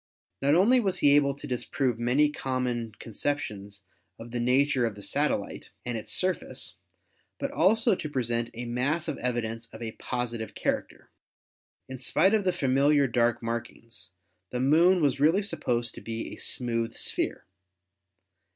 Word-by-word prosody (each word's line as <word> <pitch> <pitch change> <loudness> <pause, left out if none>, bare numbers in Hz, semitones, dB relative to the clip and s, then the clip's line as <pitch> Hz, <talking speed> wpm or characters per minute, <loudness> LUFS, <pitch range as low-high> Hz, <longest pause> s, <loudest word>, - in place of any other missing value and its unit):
Not 140 +2 +4
only 225 +9 +5
was 190 -5 0
he 145 0 +5
able 140 -1 +3
to 140 - -9
disprove 125 -1 -1
many 135 +5 +3
common 125 -5 -2
conceptions 105 -5 -4 0.3
of 115 +1 -10
the 120 - -2
nature 130 +2 +3
of 110 - -5
the 100 - -10
satellite - - -1 0.2
and 120 -1 -2
its 110 - -6
surface, 185 0 0 0.6
but 275 - -3
also 225 -5 +3
to 155 -4 -3
present 120 -4 -1
a 120 +1 -4
mass 135 +8 -1
of 150 -4 -3
evidence 115 -2 -2
of 110 -1 -12
a 110 - -4
positive 120 -2 -4
character. - - -3 0.8
In 130 -1 -7
spite 155 - +3
of 210 -3 +2
the 185 - +4
familiar 140 -2 +3
dark 120 -1 +1
markings, 115 -4 -5 0.4
the 125 - -3
Moon 165 +7 +4
was 140 -2 +2
really 165 +8 +4
supposed 120 - -1
to - - -10
be 115 0 -5
a - - -9
smooth 115 -2 -1
sphere. - - -1
125 Hz, 155 wpm, -28 LUFS, 115-150 Hz, 0.8 s, only